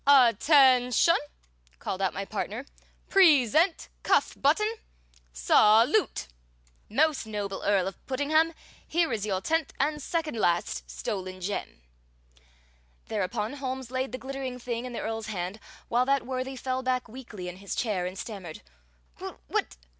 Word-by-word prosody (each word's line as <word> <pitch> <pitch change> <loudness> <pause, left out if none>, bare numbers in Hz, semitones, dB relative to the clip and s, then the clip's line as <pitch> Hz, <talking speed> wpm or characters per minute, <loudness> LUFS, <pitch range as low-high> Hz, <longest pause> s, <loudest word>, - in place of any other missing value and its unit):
"At 250 -6 +6
ten 260 -5 +5
shun!" 335 +8 +4 0.6
called 190 - -4
out 190 - +2
my 195 - -4
partner. 215 +5 -4 0.4
"Present 320 - +4
cuff - - +2
button! 425 +11 +2 0.5
Salute! 215 - +4 0.6
Most 290 +1 +1
noble 205 -2 -4
Earl 195 -2 +2
of 195 - -8
Puddingham, 310 +5 +2 0.3
here 330 -5 +1
is 215 -2 -2
your 190 -2 -1
tenth 325 +4 0
and 300 +2 0
second 315 -3 -2
last 65 - 0
stolen 185 - -5
gem!" 185 - -5 1.3
Thereupon 210 +2 -2
Holmes 260 -2 -5
laid 260 -1 -2
the 255 - -4
glittering 265 -1 -5
thing 240 -1 -4
in 250 - -6
the - - -4
Earl's 225 0 -4
hand, 190 0 -4 0.3
while 245 +2 +2
that 275 -2 +2
worthy 260 +1 -3
fell 260 0 -2
back 255 -1 -1
weakly 225 -6 -9
in 180 0 -7
his 200 0 -5
chair 195 -7 -1
and 185 +1 -7
stammered: 190 -7 -7 0.6
"What? - - -4
245 Hz, 140 wpm, -28 LUFS, 195-275 Hz, 1.3 s, At